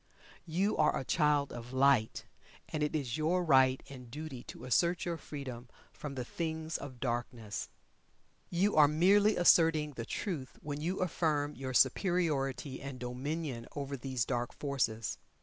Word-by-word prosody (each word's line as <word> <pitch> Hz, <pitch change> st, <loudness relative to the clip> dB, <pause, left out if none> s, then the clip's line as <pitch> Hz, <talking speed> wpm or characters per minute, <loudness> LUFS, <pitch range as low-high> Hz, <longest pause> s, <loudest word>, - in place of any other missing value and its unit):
You 190 Hz, +6 st, +1 dB
are 155 Hz, -, +3 dB
a 130 Hz, -, -4 dB
Child 150 Hz, -3 st, +2 dB
of 120 Hz, +1 st, -8 dB
Light, 130 Hz, -4 st, +3 dB, 0.4 s
and 155 Hz, -, -3 dB
it 150 Hz, +1 st, 0 dB
is 135 Hz, -6 st, -2 dB
your 170 Hz, +4 st, +1 dB
right 130 Hz, -3 st, +4 dB
and 125 Hz, -3 st, -10 dB
duty 150 Hz, -1 st, -6 dB
to -, -, -9 dB
assert 170 Hz, +7 st, +2 dB
your 170 Hz, -1 st, -2 dB
freedom 130 Hz, -6 st, -7 dB, 0.2 s
from 145 Hz, -2 st, -7 dB
the 125 Hz, -2 st, -3 dB
things 160 Hz, +1 st, -4 dB
of 130 Hz, -3 st, -8 dB
darkness. 120 Hz, -3 st, -3 dB, 0.8 s
You 190 Hz, +4 st, +1 dB
are 150 Hz, -1 st, +8 dB
merely 200 Hz, +7 st, +4 dB
asserting 160 Hz, -3 st, +5 dB
the 120 Hz, -4 st, -6 dB
Truth 155 Hz, -, -4 dB
when 145 Hz, 0 st, -4 dB
you 180 Hz, +5 st, -2 dB
affirm 150 Hz, -4 st, 0 dB
your 130 Hz, -1 st, -5 dB
superiority 140 Hz, -4 st, +1 dB
and 135 Hz, -2 st, -7 dB
dominion 125 Hz, +1 st, -4 dB
over 140 Hz, -1 st, -3 dB
these 130 Hz, -3 st, -2 dB
dark 120 Hz, -2 st, -2 dB
forces. 120 Hz, -6 st, -1 dB
145 Hz, 150 wpm, -32 LUFS, 130-160 Hz, 0.8 s, are